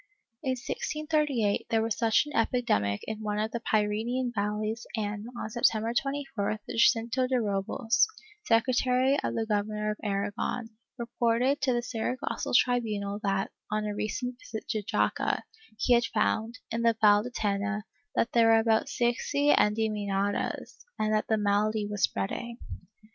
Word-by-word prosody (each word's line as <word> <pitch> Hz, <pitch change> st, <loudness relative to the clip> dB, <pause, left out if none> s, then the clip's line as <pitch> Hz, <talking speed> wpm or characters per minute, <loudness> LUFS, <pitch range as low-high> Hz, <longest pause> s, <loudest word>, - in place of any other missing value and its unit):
In 265 Hz, -3 st, 0 dB
1638 295 Hz, -4 st, -1 dB
there 225 Hz, -1 st, +2 dB
was 225 Hz, -2 st, -1 dB
such 230 Hz, +3 st, +3 dB
an 295 Hz, -, -8 dB
epidemic 105 Hz, -, +1 dB
in 220 Hz, 0 st, -5 dB
one 210 Hz, -1 st, -2 dB
of 215 Hz, +1 st, -1 dB
the 235 Hz, -, -3 dB
Pyrenean 225 Hz, +4 st, 0 dB
valleys 215 Hz, +2 st, -2 dB
and, 210 Hz, 0 st, -3 dB
on -, -, -3 dB
Septeml^er 225 Hz, 0 st, +1 dB
24th, 275 Hz, -7 st, -2 dB
Jacinto 235 Hz, +2 st, +3 dB
de 255 Hz, -1 st, +1 dB
Robles, 225 Hz, +3 st, +1 dB, 0.4 s
secretary 250 Hz, +3 st, +3 dB
of -, -, -2 dB
the 225 Hz, -, 0 dB
Gover 205 Hz, -2 st, +2 dB
nor 210 Hz, 0 st, -2 dB
of 210 Hz, -, -5 dB
Aragon, 205 Hz, +3 st, -2 dB, 0.3 s
reported 240 Hz, +3 st, +1 dB
to 260 Hz, -, +2 dB
the 240 Hz, 0 st, 0 dB
Saragossa 240 Hz, +2 st, -3 dB
tribunal 210 Hz, -5 st, 0 dB
that, 195 Hz, -1 st, 0 dB, 0.2 s
on 215 Hz, 0 st, -1 dB
a 210 Hz, -, -2 dB
recent 245 Hz, +4 st, -3 dB
visit 220 Hz, 0 st, -7 dB
to 215 Hz, -, 0 dB
Jaca, 210 Hz, +1 st, 0 dB, 0.3 s
he 245 Hz, +2 st, +3 dB
had 240 Hz, 0 st, +4 dB
found, 220 Hz, +2 st, 0 dB
in 230 Hz, +1 st, -1 dB
the 230 Hz, -1 st, +3 dB
Valle 205 Hz, -1 st, +6 dB
de 245 Hz, -, -5 dB
Tena, 210 Hz, -2 st, -1 dB, 0.3 s
that 230 Hz, -, +1 dB
there 230 Hz, -1 st, +5 dB
were 225 Hz, 0 st, +6 dB
about 225 Hz, 0 st, +2 dB
sixty 270 Hz, +4 st, +1 dB
endemoniadas 210 Hz, -3 st, 0 dB
and 215 Hz, 0 st, 0 dB
that 215 Hz, -, +1 dB
the 220 Hz, -, +2 dB
malady 210 Hz, +1 st, +1 dB
was 205 Hz, -1 st, -4 dB
spreading. 235 Hz, +4 st, -1 dB
225 Hz, 155 wpm, -28 LUFS, 210-240 Hz, 0.4 s, Valle